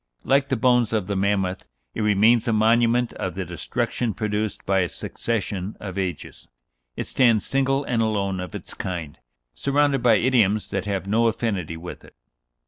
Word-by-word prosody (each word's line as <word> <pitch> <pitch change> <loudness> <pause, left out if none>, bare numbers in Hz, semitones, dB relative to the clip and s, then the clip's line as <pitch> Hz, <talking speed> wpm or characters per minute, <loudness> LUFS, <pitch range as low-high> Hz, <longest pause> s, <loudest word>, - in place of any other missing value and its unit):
Like 140 0 +2
the 130 - +1
bones 120 -2 +3
of 105 -4 0
the 100 +1 -3
mammoth, 95 -1 0 0.3
it - - -3
remains 110 +3 +4
a 115 - +2
monument 115 +2 +3
of 90 -2 -4
the 95 -1 -3
destruction 110 +6 -2
produced 105 -1 -2
by 95 0 +2
a 90 -2 0
succession 105 -3 -4
of 95 -3 -7
ages. 95 -5 -5 0.5
It - - -3
stands 115 -5 +3
single 135 +1 +1
and 120 -4 0
alone 100 -4 0
of 90 - -6
its - - -8
kind, 85 -5 -5 0.3
surrounded 140 - +1
by 120 -2 +5
idioms 110 -3 +2
that - - -2
have 100 -2 -2
no 115 +4 +2
affinity 100 -8 -2
with 90 +2 -9
it." - - -17
110 Hz, 170 wpm, -23 LUFS, 95-120 Hz, 0.5 s, by